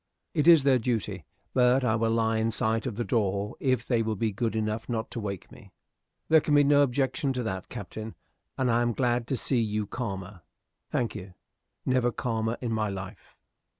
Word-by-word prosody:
"It 150 +1 +1
is 165 -5 +8
their 135 -2 +4
duty; 110 - -2 0.3
but 125 +1 +4
I 110 -3 +2
will 115 0 +1
lie 115 0 +1
in 110 +1 +1
sight 115 +1 0
of 120 - -4
the 120 - -1
door 100 -2 0
if 130 -3 +1
they 120 -3 +1
will 110 -1 -1
be 110 +2 0
good 110 +2 -2
enough 110 +1 -2
not 110 -2 -2
to - - -4
wake 100 -4 -5
me." - - -15 0.5
"There 160 -1 +6
can 145 - +1
be 145 - +6
no 145 0 +5
objection 135 0 +1
to 125 -1 -2
that; 95 -4 -4
Captain, 110 0 -7 0.4
and 130 -2 +1
I 115 +1 +3
am 120 0 +1
glad 120 0 0
to 135 - -1
see 125 +1 0
you 105 -1 -1
calmer." 95 -5 -5 0.5
"Thank 120 - -1
you; 90 0 -9 0.5
never 130 -2 +2
calmer 115 -1 -2
in 120 -2 -2
my 110 -1 0
life." 95 -1 -8
115 Hz, 200 wpm, -28 LUFS, 110-125 Hz, 0.5 s, is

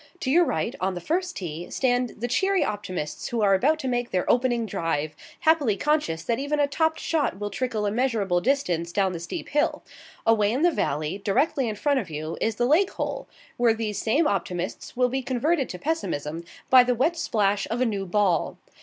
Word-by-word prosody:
To 260 - 0
your 345 +4 +5
right, 155 - -1
on 190 0 -1
the - - -3
first 360 - -2
tee, 170 -2 -6
stand 245 -2 0
the 240 - -2
cheery 385 - +2
optimists 185 -7 -4
who 235 -2 -2
are 200 -2 +4
about 285 +11 +3
to 265 - -4
make 245 -1 -1
their 180 - -1
opening 240 -2 +2
drive, 155 -5 -2 0.3
happily 295 -10 +3
conscious 295 - 0
that 230 +7 -1
even 290 +2 -1
a 290 - +5
topped 320 +3 0
shot 305 - 0
will 205 0 -4
trickle 220 -1 -2
a 205 - 0
measurable 215 -7 +1
distance 175 -10 0
down 195 0 +1
the 170 - -5
steep 170 - -6
hill. 295 +1 0 0.4
Away 215 -2 +3
in 260 +7 0
the 350 - +5
valley, 155 - -2
directly 270 +4 +1
in 215 - -3
front 280 +5 +1
of 195 -8 -6
you, 155 +1 -4
is 225 -1 0
the 240 - +1
lake 325 +9 +4
hole, - - -4 0.3
where 235 -2 +3
these 215 -2 -3
same 280 +9 +2
optimists 180 - -3
will 250 0 +4
be 265 +2 -2
converted 270 +4 0
to 180 - -5
pessimism 170 - -3 0.3
by 255 -1 +9
the 250 0 +1
wet 310 +9 +1
splash 205 -10 0
of 230 - -2
a 255 - +3
new 200 -4 -2
ball. 185 -4 +1
230 Hz, 205 wpm, -25 LUFS, 190-280 Hz, 0.4 s, by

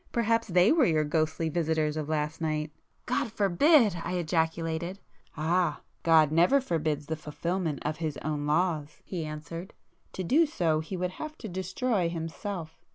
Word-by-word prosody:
Perhaps 230 -1 +1
they 180 +1 +4
were 310 -4 +5
your 155 -1 +2
ghostly 155 +1 0
visitors 160 -2 0
of 155 -1 -3
last 150 +1 -1
night!" 155 -1 -1 0.3
"God 245 -2 -1
forbid!" 210 - +4
I - - -3
ejaculated. 165 +1 -1 0.4
"Ah! 170 +3 +1 0.2
God 160 -3 +5
never 175 - +5
forbids 155 - -1
the 160 - -2
fulfilment 160 +1 -3
of 150 +1 -1
His 155 -3 -3
own 150 -1 -2
laws!" 155 -1 0
he 175 -4 -4
answered—"To 165 +4 -8
do 305 - +4
so 165 - +1
He 160 +4 -5
would 180 0 -1
have 305 +10 -7
to 220 - -7
destroy 185 +1 -1
Himself." 165 +1 -5
165 Hz, 155 wpm, -28 LUFS, 155-185 Hz, 0.4 s, were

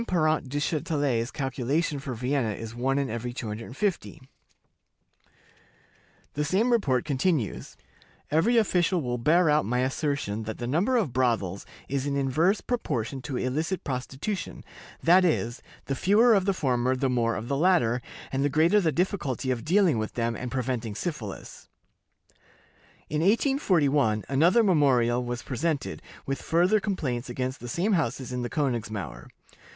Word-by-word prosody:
Parent 155 -5 +1
Duchatelet's 145 -4 -1
calculation 140 +4 -1
for 135 -2 -5
Vienna 125 -1 -1
is 115 +2 -7
1 130 +3 0
in 140 -1 0
every 115 +1 -4
250." 125 - -3 2.1
The 150 - -1
same 195 +10 +1
report 135 - +2
continues: 135 - -1 0.5
"Every 200 +11 +3
official 180 -5 +2
will 125 -1 -2
bear 165 +8 +4
out 150 0 +3
my 125 +4 0
assertion 135 -5 -1
that 110 - -5
the 120 - -4
number 175 - +1
of 180 - 0
brothels 115 -7 0 0.2
is 135 +1 -2
in 140 - -1
inverse 155 +9 +2
proportion 135 - -2
to 130 0 -4
illicit 155 +9 -2
prostitution; 135 +9 -4 0.4
that 180 +3 +6
is, 120 -9 0 0.2
the 140 - -2
fewer 210 - +4
of 195 -3 +3
the 195 - +2
former, 130 -4 +1
the 135 +1 0
more 120 -2 +1
of 110 - -5
the 140 - -1
latter, 140 -7 +2 0.3
and 135 +1 0
the 145 - +2
greater 165 +8 +4
the 165 -4 +2
difficulty 155 - -1
of 120 -3 -2
dealing 175 - +3
with 110 - -4
them, 115 -1 -1
and 125 +1 -5
preventing 120 -4 -3
syphilis." 115 - -6 1.4
In 150 +1 -1
1841 165 - +2
another 170 - +4
memorial 130 - +3
was 120 0 -4
presented, 145 +3 -2 0.2
with 135 0 -3
further 180 +6 +3
complaints 135 - -3
against 130 +2 -3
the 120 - -8
same 185 - 0
houses 140 -7 -1
in 125 - -2
the 120 - -3
Königsmauer. 115 -8 -3
140 Hz, 145 wpm, -27 LUFS, 120-170 Hz, 2.1 s, that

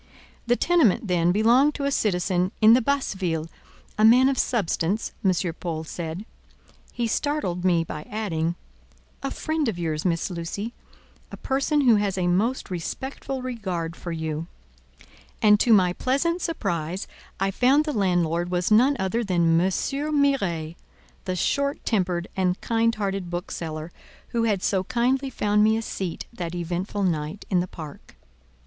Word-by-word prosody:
The 240 - +4
tenement, 270 - +3
then, 175 -1 +2
belonged 240 +9 +4
to 285 - -4
a 280 - +1
citizen 185 -5 +1
in 220 0 +7
the 250 - +5
Basse 280 +1 0
Ville—a 170 +3 -5
man 250 +4 +7
of 270 - -1
substance, 205 -2 0
M. 190 - +4 0.3
Paul 160 -3 -3
said; 165 +4 -6 0.7
he 240 - -2
startled 230 - -1
me 175 -3 +3
by 150 -1 -7
adding: 170 -6 -2 0.7
"a 275 - -2
friend 310 0 -2
of 200 - -4
yours, 160 -3 -2
Miss 175 +1 0
Lucy, 180 +7 -4 0.6
a - - -7
person 275 +3 +1
who 240 -5 +5
has 200 -2 -1
a 180 - 0
most 205 +6 0
respectful 265 - -5
regard 185 -10 -3
for 175 - -7
you." 160 0 -3 0.9
And, 210 -1 +5
to 235 - +3
my 185 -4 +5
pleasant 330 - 0
surprise, 175 - -2 0.3
I 195 +1 +1
found 265 +8 +3
the 300 - -2
landlord 175 -4 +1
was 180 +2 -1
none 255 +7 +5
other 225 +4 -1
than 170 -4 +3
M. 185 - +2
Miret, 275 - 0 0.5
the 185 - -2
short 280 +9 -1
tempered 180 -5 0
and 185 -1 0
kind 230 0 +1
hearted 195 -3 -3
bookseller, 165 -2 -5 0.4
who 230 -1 0
had 205 -4 0
so 190 -2 +1
kindly 255 +3 0
found 210 -4 +2
me 220 +1 +4
a 225 - -3
seat 185 -5 -4
that 175 -5 -5
eventful 175 +4 -3
night 160 +1 -2
in 180 - +3
the 180 - -1
park. 155 -5 -11
195 Hz, 155 wpm, -25 LUFS, 175-240 Hz, 0.9 s, in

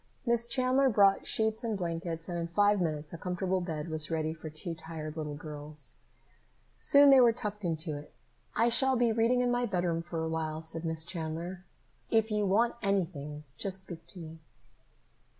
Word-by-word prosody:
Miss 235 -1 +2
Chandler 255 +2 +3
brought 200 -3 +4
sheets 220 +1 +1
and 225 -3 -1
blankets, 165 -2 -3
and 175 - -4
in 170 - -2
five 205 +3 +3
minutes 155 -2 -2
a 165 - -7
comfortable 185 +1 -1
bed 160 -3 -4
was 155 -2 +2
ready 160 -1 -1
for 160 -1 -8
two 160 +3 -4
tired 160 -1 -7
little 150 -2 -4
girls. 150 -1 -5 0.9
Soon 285 0 +7
they 265 -1 +8
were 240 -1 +6
tucked 210 -2 -5
into 160 -2 -2
it. 145 +1 -9 0.4
"I 230 - +3
shall 260 +3 +3
be 240 -1 +3
reading 230 +3 +2
in 245 0 +1
my 245 0 +1
bedroom 175 -4 0
for 165 -1 -4
a - - -1
while," 160 -1 -3
said 160 +1 -5
Miss 160 0 -1
Chandler. 170 +2 -4 0.4
"If 225 -1 +2
you 210 -1 +1
want 230 +5 +2
anything, 160 -7 -2 0.2
just 190 -1 -1
speak 170 -3 -9
to - - -12
me." 160 -1 -9
175 Hz, 185 wpm, -30 LUFS, 160-220 Hz, 0.9 s, they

